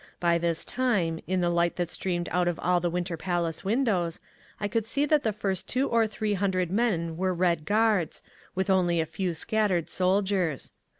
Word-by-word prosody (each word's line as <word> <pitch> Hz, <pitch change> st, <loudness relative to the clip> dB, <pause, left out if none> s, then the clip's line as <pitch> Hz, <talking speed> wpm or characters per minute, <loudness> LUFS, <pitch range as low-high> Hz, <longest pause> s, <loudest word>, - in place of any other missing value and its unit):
By 170 Hz, -1 st, +2 dB
this 170 Hz, -1 st, -1 dB
time, 200 Hz, -11 st, 0 dB
in 185 Hz, +1 st, 0 dB
the 175 Hz, 0 st, +2 dB
light 170 Hz, 0 st, +1 dB
that 175 Hz, -1 st, -2 dB
streamed 175 Hz, -2 st, -2 dB
out 180 Hz, 0 st, +1 dB
of 175 Hz, -2 st, 0 dB
all 180 Hz, 0 st, +3 dB
the 175 Hz, 0 st, 0 dB
Winter 175 Hz, 0 st, -2 dB
Palace 170 Hz, -1 st, -2 dB
windows, 195 Hz, -6 st, 0 dB, 0.4 s
I 205 Hz, -, -1 dB
could 225 Hz, +1 st, -1 dB
see 280 Hz, +5 st, +1 dB
that 295 Hz, 0 st, +3 dB
the 220 Hz, -, 0 dB
first 195 Hz, -2 st, -3 dB
two 260 Hz, +2 st, 0 dB
or 230 Hz, -1 st, +3 dB
three 215 Hz, 0 st, -2 dB
hundred 185 Hz, -3 st, 0 dB
men 180 Hz, -7 st, 0 dB
were 185 Hz, 0 st, 0 dB
Red 170 Hz, -3 st, +1 dB
Guards, 210 Hz, -4 st, +1 dB, 0.3 s
with 190 Hz, +1 st, 0 dB
only 175 Hz, -3 st, +3 dB
a 160 Hz, -, +1 dB
few 170 Hz, +2 st, -3 dB
scattered 190 Hz, -1 st, 0 dB
soldiers. 185 Hz, -4 st, 0 dB
180 Hz, 190 wpm, -27 LUFS, 170-205 Hz, 0.4 s, all